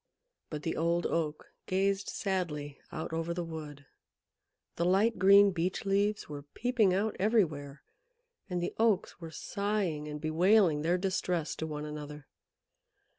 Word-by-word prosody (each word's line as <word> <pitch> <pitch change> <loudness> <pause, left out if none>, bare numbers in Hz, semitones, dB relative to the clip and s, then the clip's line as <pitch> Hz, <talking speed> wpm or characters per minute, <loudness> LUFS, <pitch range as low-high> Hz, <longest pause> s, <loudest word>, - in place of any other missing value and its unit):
But 150 -1 -5
the 165 - -1
Old 170 +1 +1
Oak 155 -2 -2
gazed 195 +1 +1
sadly 155 -7 -3
out 160 +1 -5
over 165 +1 -2
the 175 - -2
wood. 150 -4 -8 0.9
The 170 - +1
light 195 +6 +3
green 200 +1 +7
Beech 180 +3 -2
leaves 200 +1 +1
were 145 -1 -6
peeping 220 - +1
out 205 +4 0
everywhere, 155 -10 +1 0.7
and 175 -1 -1
the - - -2
Oaks 215 -5 +1
were 165 - -6
sighing 195 -4 -2
and 150 0 -5
bewailing 165 +1 +3
their 170 +3 +2
distress 180 -3 -1
to 160 - -3
one 150 -1 -5
another. 150 -1 -7
170 Hz, 140 wpm, -31 LUFS, 150-195 Hz, 0.9 s, green